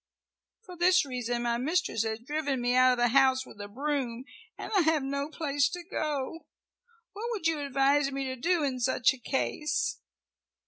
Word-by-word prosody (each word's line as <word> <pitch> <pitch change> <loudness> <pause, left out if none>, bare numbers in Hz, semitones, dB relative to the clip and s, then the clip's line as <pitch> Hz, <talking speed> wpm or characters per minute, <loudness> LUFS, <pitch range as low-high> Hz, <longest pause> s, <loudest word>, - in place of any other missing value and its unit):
For 365 -4 -11
this 360 -1 +4
reason 245 -2 -3
my 235 0 0
mistress 310 - 0
has 220 0 -2
driven 280 +2 -2
me 245 0 +1
out 255 0 +5
of - - -2
the 240 0 +3
house 260 0 +4
with 205 - -12
a 205 - -6
broom, 255 0 -3 0.3
and - - -7
I - - +5
have 320 -3 +2
no 280 +2 -2
place 290 -3 0
to 355 -1 -6
go. 310 -3 -4 0.7
What 430 +4 -5
would 430 -8 -4
you 325 -2 +2
advise 275 0 +2
me 275 0 -3
to 260 0 -3
do 335 +5 +1
in 265 -3 -1
such 250 +1 +2
a 265 - -12
case?" 265 -1 -1
275 Hz, 185 wpm, -29 LUFS, 250-310 Hz, 0.7 s, out